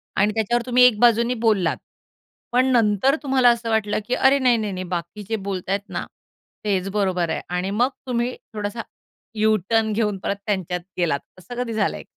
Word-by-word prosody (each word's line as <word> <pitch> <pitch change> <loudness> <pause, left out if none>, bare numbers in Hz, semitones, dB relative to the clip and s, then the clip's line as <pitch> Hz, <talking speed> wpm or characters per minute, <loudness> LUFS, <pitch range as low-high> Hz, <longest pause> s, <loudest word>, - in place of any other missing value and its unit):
आणि 205 +2 +3
त्याच्यावर 235 +2 0
तुम्ही 250 0 +4
एक 245 -4 +5
बाजूने 235 0 +4
बोललात. 195 -7 +2 0.7
पण 250 +1 +3
नंतर 230 +3 +3
तुम्हाला 260 -3 +4
असं 235 -1 0
वाटलं 215 -2 +1
की 245 - -1
अरे! 270 +1 +4
नाही, 250 -3 +4
नाही, 215 -2 -2
नाही 185 - -4
बाकी 175 +5 -5
जे 225 - 0
बोलतायत 195 +2 -3
ना - - -4 0.6
तेच 195 -2 0
बरोबर 185 -4 0
आहे - - -2 0.2
आणि 185 +2 -2
मग 240 +5 +2 0.2
तुम्ही 245 0 -1 0.2
थोडासा 210 +2 -4 0.5
यूटर्न 215 +1 +2
घेऊन 210 -2 0
परत 200 - -1
त्यांच्यात 185 -4 -2 0.2
गेलात, 165 -5 +1 0.2
असं 195 +7 -10
कधी 230 -2 -5
झालंय? 215 -1 -1
215 Hz, 175 wpm, -22 LUFS, 195-240 Hz, 0.7 s, एक